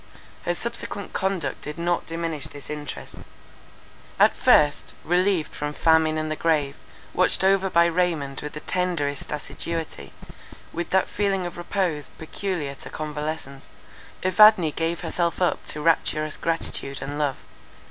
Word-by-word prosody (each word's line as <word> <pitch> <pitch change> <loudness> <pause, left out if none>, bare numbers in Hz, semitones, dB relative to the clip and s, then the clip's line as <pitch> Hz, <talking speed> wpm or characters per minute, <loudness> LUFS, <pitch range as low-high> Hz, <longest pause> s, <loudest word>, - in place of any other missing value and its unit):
Her 175 - +1
subsequent 205 -2 -5
conduct 190 -2 -1
did 150 +2 -6
not 175 +1 0
diminish 165 -2 -3
this 145 +1 -9
interest. 150 -1 -6 1.1
At - - +6
first, 150 -1 +4
relieved 180 -1 +1
from 150 0 -3
famine 160 0 +3
and 155 0 -2
the - - 0
grave, 150 -4 +1 0.4
watched - - +3
over 195 0 +4
by 170 -1 +5
Raymond 165 -6 0
with 150 - -6
the 150 - -6
tenderest 170 -7 -1
assiduity, 160 +2 -4 0.6
with 170 +1 -3
that 190 0 +3
feeling 195 -3 0
of 175 - -5
repose 175 -5 -1
peculiar 160 -3 -3
to - - -11
convalescence, 150 -2 -5 0.6
Evadne 185 -3 +7
gave 165 +2 -2
herself 170 -1 -1
up 180 -2 +1
to 150 - -3
rapturous 155 -1 +1
gratitude 165 -4 -2
and 145 +1 -5
love. 145 -3 +1
165 Hz, 135 wpm, -25 LUFS, 150-180 Hz, 1.1 s, Evadne